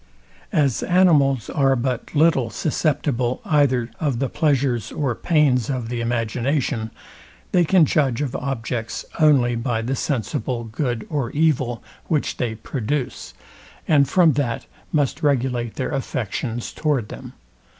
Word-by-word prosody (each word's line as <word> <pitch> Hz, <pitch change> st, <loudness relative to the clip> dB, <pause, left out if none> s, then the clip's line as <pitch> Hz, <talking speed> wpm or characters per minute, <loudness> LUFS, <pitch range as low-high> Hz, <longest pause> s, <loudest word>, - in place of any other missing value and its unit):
As 140 Hz, -6 st, +2 dB
animals 145 Hz, -, +3 dB
are 135 Hz, -1 st, +2 dB
but 125 Hz, +1 st, -3 dB
little 145 Hz, -6 st, +3 dB
susceptible 135 Hz, -4 st, -1 dB
either 130 Hz, -6 st, +2 dB
of 145 Hz, -7 st, 0 dB
the 135 Hz, +1 st, -1 dB
pleasures 135 Hz, -, 0 dB
or 135 Hz, -5 st, -1 dB
pains 145 Hz, -6 st, +2 dB
of 125 Hz, -4 st, -2 dB
the 120 Hz, -1 st, -3 dB
imagination, 120 Hz, +1 st, -1 dB, 0.6 s
they 180 Hz, -, +4 dB
can 170 Hz, 0 st, +5 dB
judge 135 Hz, -6 st, +1 dB
of 145 Hz, -4 st, -2 dB
objects 120 Hz, -3 st, -3 dB
only 135 Hz, -6 st, +4 dB
by 115 Hz, -1 st, -1 dB
the 130 Hz, +4 st, -1 dB
sensible 125 Hz, -2 st, -2 dB
good 115 Hz, 0 st, -3 dB
or 140 Hz, -6 st, -2 dB
evil, 140 Hz, -6 st, +1 dB, 0.2 s
which 155 Hz, -4 st, 0 dB
they 115 Hz, -3 st, -2 dB
produce, 125 Hz, +3 st, -4 dB, 0.5 s
and 140 Hz, -3 st, +4 dB
from 170 Hz, -2 st, +5 dB
that 130 Hz, -4 st, -2 dB, 0.3 s
must 145 Hz, -4 st, 0 dB
regulate 125 Hz, -5 st, 0 dB
their 130 Hz, -, -2 dB
affections 120 Hz, -2 st, -3 dB
towards 140 Hz, -9 st, -1 dB
them. -, -, -9 dB
130 Hz, 130 wpm, -22 LUFS, 120-145 Hz, 0.6 s, can